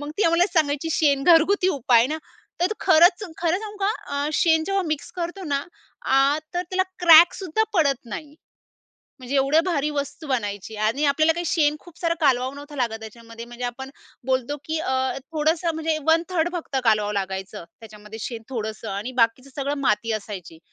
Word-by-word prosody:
मग 290 0 -6
ती - - +3
आम्हाला 335 +2 +4
सांगायची 310 0 +1
शेण 280 -4 +2
घरगुती 360 +3 +4
उपाय 240 -1 +4
ना, 310 +3 -3 0.4
तर 350 - +4
तो - - -1
खरंच 345 +4 +5 0.2
खरं 345 +2 +1
सांगू 425 -1 -8
का 420 - +2 0.3
अ, - - -1
शेण 320 -1 +3
जेव्हा 390 0 0
मिक्स 310 -2 -4
करतो 350 +2 -4
ना, 280 -3 -1 0.4
आ 275 +2 +3 0.2
तर 355 - 0
त्याला 370 +1 0 0.2
क्रॅक 335 +1 +9
सुद्धा 385 +3 -1
पडत 280 -7 +1
नाही. 295 +6 -8 0.8
म्हणजे 255 +2 -6
एवढ्या 275 +4 +4
भारी 300 -5 0
वस्तू 290 +2 -5
बनायची 205 -4 -3
आणि 260 +8 +1
आपल्याला 310 +3 +3
काही 345 +2 -4
शेण 300 -3 +2
खूप 345 -2 -17
सारं 335 -1 +1
कालवावं 260 -2 +2
नव्हतं 290 +1 -10
लागत 230 -4 -2
त्याच्यामध्ये, 230 +1 -10
म्हणजे 240 +1 -8
आपण 265 +2 -7 0.4
बोलतो 260 +2 0
की 315 +1 -2
अ, 260 -3 0 0.2
थोडंसं 320 +2 0
म्हणजे 320 0 -1
1/3र्ड 330 +1 +2
फक्त 330 -5 -4
कालवावं 210 -2 +2
लागायचं 190 -1 -4 0.2
त्याच्यामध्ये 215 0 -11
शेण 230 -1 -5
थोडंसं 220 -2 -5
आणि 205 +6 -4
बाकीचं 250 +4 -1
सगळं 280 +1 -2
माती 230 -2 +1
असायची 195 -6 -6
285 Hz, 175 wpm, -23 LUFS, 235-330 Hz, 0.8 s, क्रॅक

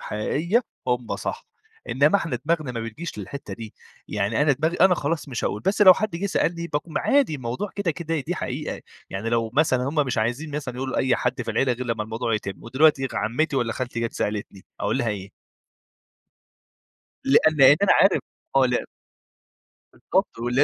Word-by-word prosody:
حقيقية 165 - 0 0.2
هُم 125 -2 -1
صح، - - -5 0.4
إنما 150 +7 +4
إحنا 165 -10 -2
دماغنا 155 -5 0
ما 115 - -4
بتجيش 115 +7 -6
للحتة 105 +8 -7
دي، 110 -2 -9 0.3
يعني 105 +5 0
أنا 150 -1 +4
دماغي 160 +5 0
أنا 185 0 +6
خلاص 155 -1 -2
مش 125 -3 -3
هاقول، 105 - -1
بس 200 - +2
لو 185 -2 +10
حد 215 +3 -2
جه 195 +4 -2
سألني 170 -3 0
باقوم 150 0 -3
عادي 275 - +2
الموضوع 130 - -4
كده 200 -4 0
كده 165 0 -3
دي 160 +6 -3
حقيقة، 145 -1 -4 0.3
يعني 100 +4 -3
لو 115 -1 0
مثلًا 135 -4 +3
هُم 145 - -4
مش 125 -3 -1
عايزين 120 +8 -1
مثلًا 130 -4 -5
يقولوا 130 +1 -3
لأي 130 -1 +2
حد 125 +1 -1
في - - -4
العيلة 130 -2 +2
غير 125 +1 -5
لما 115 -2 -1
الموضوع 115 +1 -2
يتم، 100 -2 -5
ودلوقتي 135 +2 +3
عمتي 140 +7 0
والّا 120 -3 0
خالتي 125 -2 -4
جات 115 -1 -2
سألتني 105 -2 -4 0.2
أقول - - 0
لها 120 - 0
إيه؟ 100 -2 -5 1.9
لأن 155 +3 +4
لأن 135 +1 +8
أنا 200 - +6
عارف 195 - +5 0.4
آه 135 -1 +6
ل 125 -1 0 1.1
بالضبط، - - -1
و 120 +1 -2
130 Hz, 180 wpm, -24 LUFS, 115-160 Hz, 1.9 s, لو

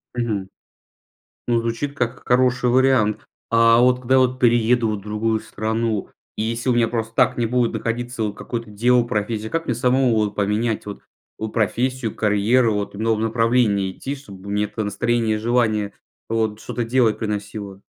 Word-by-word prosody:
Мгм. 110 -6 -2 1.0
Ну, 120 -1 +2
звучит 115 +5 -3
как 120 -2 -3
хороший 125 0 +2
вариант. 125 -4 +2 0.2
А, 115 0 +5
вот, 125 0 +4
когда 130 +1 +3
вот 130 0 +2
перееду 120 -1 +3
вот 105 - -2
в - - -13
другую 110 +2 -1
страну, 110 -1 -2 0.3
если 115 +3 -2
у 125 - +3
меня 120 -1 +3
просто 115 -1 -3
так - - +3
не 120 - +1
будет 120 0 +1
находиться 115 +1 -3
вот 105 -1 -1
какое-то 115 -2 -5
дело, 120 +4 +3
профессия, 110 -1 -2
как 165 0 -1
мне 120 - 0
самому 125 0 +2
вот 105 -2 0
поменять 105 +2 0
вот 105 - -7 0.4
у 110 - -3
профессию, 120 +2 -1
карьеру, 110 +3 +2
вот 105 0 -3
в - - -8
новом 110 0 0
направлении 115 -4 +2
идти, 135 +8 -5
чтобы 100 -8 -11
мне 105 +1 +1
это 105 +1 -4
настроение 110 +2 0
и - - -3
желание 110 -3 +1 0.4
вот 110 -1 -1
что-то 120 +1 -3
делать 115 -2 +2
приносило? 105 -2 -5
115 Hz, 170 wpm, -21 LUFS, 105-120 Hz, 1.0 s, А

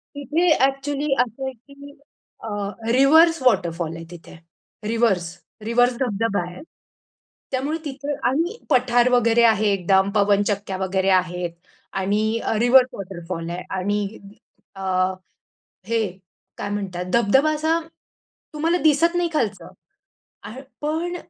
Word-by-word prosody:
तिथे 300 +5 0 0.2
एक्चुअली 275 +1 -2
असं 245 +2 -1
आहे 265 - -4
की 280 +4 -15 0.5
अ, - - -6 0.4
रिव्हर्स 315 +5 +5
वॉटरफॉल 170 -8 +1
आहे 165 0 -8
तिथे. 175 0 -12 0.5
रिव्हर्स. 225 -6 +1 0.4
रिव्हर्स 245 +2 +3
धबधबा 225 -5 0
आहे. 180 - -11 0.9
त्यामुळे 280 +5 -1
तिथं 285 +1 -4 0.2
आणि 335 - -1
पठार 250 -2 +3
वगैरे 235 -1 +3
आहे 215 -2 +4
एकदम, 190 +1 +2
पवन 205 0 +3
चक्क्या 200 -2 -3
वगैरे 190 0 0
आहेत 180 -2 +1 0.5
आणि 215 +4 0
अ, - - 0
रिव्हर्स 250 +2 +6
वॉटरफॉल 175 -3 -6
आहे 180 +1 -5
आणि 205 +2 -2 0.6
अ, 195 - -9 1.1
हे 230 0 +1 0.6
काय - - -4
म्हणतात 190 -3 -4
धबधबा 265 +7 +3
असा 320 +2 +1 0.7
तुम्हाला 330 +4 +1
दिसत 330 +3 +3
नाही 350 -1 +1
खालचं. 215 -9 -2 0.8
आहे 225 +6 -9 0.2
पण 325 +4 -2
230 Hz, 120 wpm, -22 LUFS, 195-280 Hz, 1.1 s, रिव्हर्स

